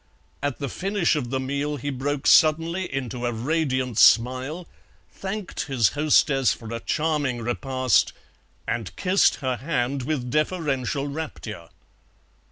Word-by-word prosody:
At 145 -2 -2
the 140 - -3
finish 190 - 0
of 130 -5 -2
the 130 +1 -1
meal 140 +3 -2
he 145 +2 -4
broke 140 +2 -3
suddenly 165 +4 +4
into 125 -3 -3
a - - 0
radiant 130 -1 -1
smile, 130 +8 +3 0.4
thanked 195 0 -5
his 125 -6 +3
hostess 145 -3 +3
for 115 -1 -8
a 115 - -3
charming 145 -5 -1
repast, 130 0 +1 0.6
and 115 -3 -3
kissed 190 +1 +3
her 130 -1 0
hand 135 0 -1
with 125 -2 -3
deferential 150 -3 -1
rapture. 120 - -6
135 Hz, 130 wpm, -24 LUFS, 125-155 Hz, 0.6 s, suddenly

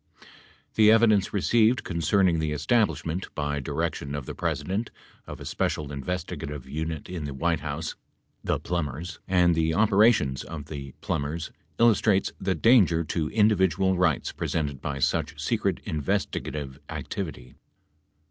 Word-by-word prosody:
The 110 -1 +6
evidence 110 -3 +4
received 110 +4 +3
concerning 85 0 +2
the 80 -1 -1
establishment, 95 -1 0
by 75 -1 -1
direction 70 +1 -3
of 70 -3 -5
the - - -6
President, 85 +7 -2 0.4
of - - -8
a - - -9
special 75 -2 -2
investigative 70 -2 -5
unit 80 +2 -4
in 90 -4 -5
the 70 -2 -5
White 80 +2 +1
House 75 +1 -4 0.5
(the - - +1
Plumbers) 85 -1 -4
and 90 -2 +4
the 80 0 +1
operations 105 - +4
of 75 -3 -7
the 70 -3 -7
Plumbers 75 +3 -3 0.3
illustrates 110 -4 +3
the 95 -1 0
danger 95 -9 +5
to 80 -1 -2
individual 95 -4 +3
rights 90 -4 +1
presented 70 -5 -3
by 70 -2 -3
such 70 - 0
secret - - 0
investigative 75 -1 -2
activity. - - -5
80 Hz, 130 wpm, -26 LUFS, 75-95 Hz, 0.5 s, The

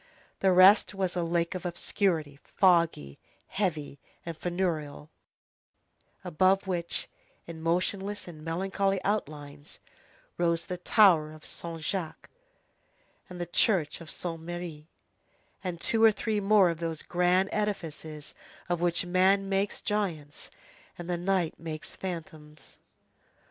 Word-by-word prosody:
The 190 - +3
rest 190 +3 +6
was 190 -2 -1
a 175 - 0
lake 170 +1 0
of 185 - -5
obscurity, 170 -4 -1
foggy, 170 - +2 0.3
heavy, 155 -8 -2 0.3
and 170 -1 -5
funereal, 160 -4 -3 1.1
above 185 +3 +2
which, 175 -3 -1 0.4
in 165 -1 -9
motionless 190 +5 -1
and 155 -3 -10
melancholy 195 +4 0
outlines, 150 -8 -4 0.6
rose 170 -1 +1
the 180 - -4
tower 180 -6 +5
of 155 0 -13
Saint 165 -1 -6
Jacques, 170 0 -4 1.0
the 175 -1 -5
church 175 -2 +1
of 165 - -9
Saint 165 0 -4
Merry, 170 -2 -7 0.8
and 180 -3 -4
two 225 +5 +2
or 225 - +8
three 215 0 -1
more 200 -3 +5
of 165 - -6
those 165 -2 -3
grand 180 +2 +2
edifices 160 -7 -4 0.4
of 175 -1 0
which 175 0 +2
man 190 +2 +3
makes 195 +1 -1
giants 170 -9 -2 0.5
and 175 - -7
the - - +1
night 180 -2 0
makes 160 -2 -6
phantoms. 155 -5 -8
175 Hz, 125 wpm, -29 LUFS, 160-190 Hz, 1.1 s, or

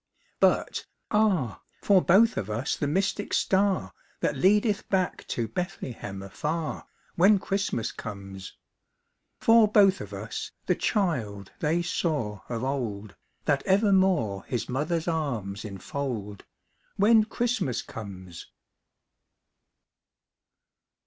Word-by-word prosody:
But - - +2 0.2
ah, 190 - +1 0.2
for 195 -2 +5
both 215 +7 +5
of 100 - -3
us 110 +5 -1
the 145 - -2
mystic 195 +6 0
star 190 - +1 0.3
That - - +1
leadeth 205 +2 +2
back 185 -2 0
to 115 -2 -2
Bethlehem 115 - -5
afar, 150 - -4 0.3
When 195 +4 +5
Christmas 195 - -1
comes. 100 -3 -8 0.8
For 225 -1 +6
both 200 -2 +5
of - - -8
us - - -6
the - - +3
child 115 - -1
they 165 +3 +1
saw 145 - -2
of 115 -1 -3
old, 110 -7 -3 0.3
That 145 -3 +2
evermore 190 - +3
his 120 -4 -3
mother's 155 +6 -1
arms 120 - -2
enfold, 105 0 -5 0.5
When 220 +2 +5
Christmas 220 - -1
comes. 95 -5 -9
150 Hz, 105 wpm, -27 LUFS, -, 0.8 s, For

